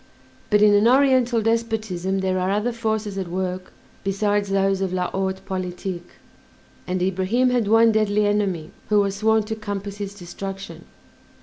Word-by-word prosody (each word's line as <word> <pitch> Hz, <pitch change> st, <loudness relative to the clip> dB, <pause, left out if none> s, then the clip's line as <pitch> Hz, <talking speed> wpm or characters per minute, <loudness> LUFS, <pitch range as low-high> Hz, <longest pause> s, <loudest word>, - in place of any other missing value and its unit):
But 210 Hz, -1 st, +4 dB
in 210 Hz, -1 st, +6 dB
an 205 Hz, +2 st, +5 dB
oriental 255 Hz, -3 st, +3 dB
despotism 215 Hz, -5 st, -1 dB
there 185 Hz, -1 st, 0 dB
are 185 Hz, +1 st, 0 dB
other 210 Hz, +5 st, 0 dB
forces 220 Hz, -3 st, -2 dB
at 185 Hz, -, -3 dB
work 185 Hz, +1 st, -4 dB, 0.3 s
besides 205 Hz, +1 st, 0 dB
those 195 Hz, 0 st, +1 dB
of 190 Hz, -2 st, -1 dB
la 180 Hz, -1 st, -1 dB
haute 190 Hz, 0 st, -3 dB
politique, 180 Hz, -1 st, -5 dB, 0.7 s
and 180 Hz, 0 st, -1 dB
Ibrahim 190 Hz, +7 st, +1 dB
had 240 Hz, -4 st, +1 dB
one 225 Hz, +1 st, +5 dB
deadly 210 Hz, -1 st, +2 dB
enemy 200 Hz, -6 st, 0 dB, 0.2 s
who 210 Hz, -1 st, +4 dB
was 200 Hz, -1 st, 0 dB
sworn 220 Hz, +1 st, +3 dB
to 215 Hz, +1 st, -4 dB
compass 205 Hz, -2 st, -5 dB
his 200 Hz, -1 st, -5 dB
destruction. 195 Hz, +1 st, -8 dB
200 Hz, 160 wpm, -23 LUFS, 190-220 Hz, 0.7 s, in